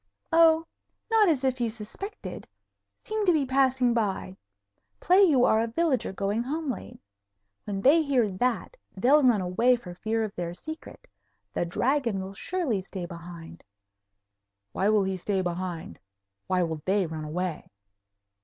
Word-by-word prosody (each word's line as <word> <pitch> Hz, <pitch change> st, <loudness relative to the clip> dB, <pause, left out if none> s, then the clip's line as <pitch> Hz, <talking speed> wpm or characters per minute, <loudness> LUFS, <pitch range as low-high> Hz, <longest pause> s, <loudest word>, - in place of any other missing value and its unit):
"Oh, 325 Hz, 0 st, +5 dB, 0.5 s
not 435 Hz, -4 st, +5 dB
as 280 Hz, -5 st, +1 dB
if 260 Hz, -1 st, 0 dB
you 235 Hz, -, +1 dB
suspected. 235 Hz, -, -7 dB, 0.6 s
Seem 435 Hz, 0 st, -2 dB
to -, -, +7 dB
be 305 Hz, -5 st, +2 dB
passing 260 Hz, -2 st, +2 dB
by. 200 Hz, -4 st, -2 dB, 0.6 s
Play 370 Hz, +3 st, +4 dB
you 285 Hz, -10 st, +5 dB
are 220 Hz, -, +4 dB
a 230 Hz, -, 0 dB
villager 270 Hz, -, 0 dB
going 200 Hz, +3 st, -1 dB
home 295 Hz, +3 st, -2 dB
late. -, -, -8 dB, 0.7 s
When 195 Hz, -1 st, -3 dB
they 295 Hz, +8 st, +6 dB
hear 270 Hz, -7 st, +2 dB
that, 245 Hz, -, -2 dB, 0.2 s
they'll 270 Hz, +9 st, +5 dB
run 245 Hz, -7 st, +4 dB
away 230 Hz, +8 st, +3 dB
for 200 Hz, -7 st, -9 dB
fear 220 Hz, +5 st, -1 dB
of 210 Hz, -2 st, -4 dB
their 175 Hz, 0 st, -4 dB
secret. 315 Hz, -, -9 dB, 0.5 s
The -, -, 0 dB
Dragon 235 Hz, +3 st, 0 dB
will 190 Hz, +1 st, -6 dB
surely 275 Hz, -, -2 dB
stay 185 Hz, -1 st, -6 dB
behind." 170 Hz, -1 st, -10 dB, 1.1 s
"Why 195 Hz, -, +1 dB
will 215 Hz, -2 st, +4 dB
he 190 Hz, 0 st, -2 dB
stay 190 Hz, +1 st, -1 dB
behind? 175 Hz, -, -4 dB, 0.5 s
Why 185 Hz, -1 st, +2 dB
will 160 Hz, -2 st, -3 dB
they 195 Hz, 0 st, +2 dB
run 160 Hz, -1 st, -5 dB
away?" 170 Hz, +2 st, -4 dB
225 Hz, 155 wpm, -27 LUFS, 185-275 Hz, 1.1 s, to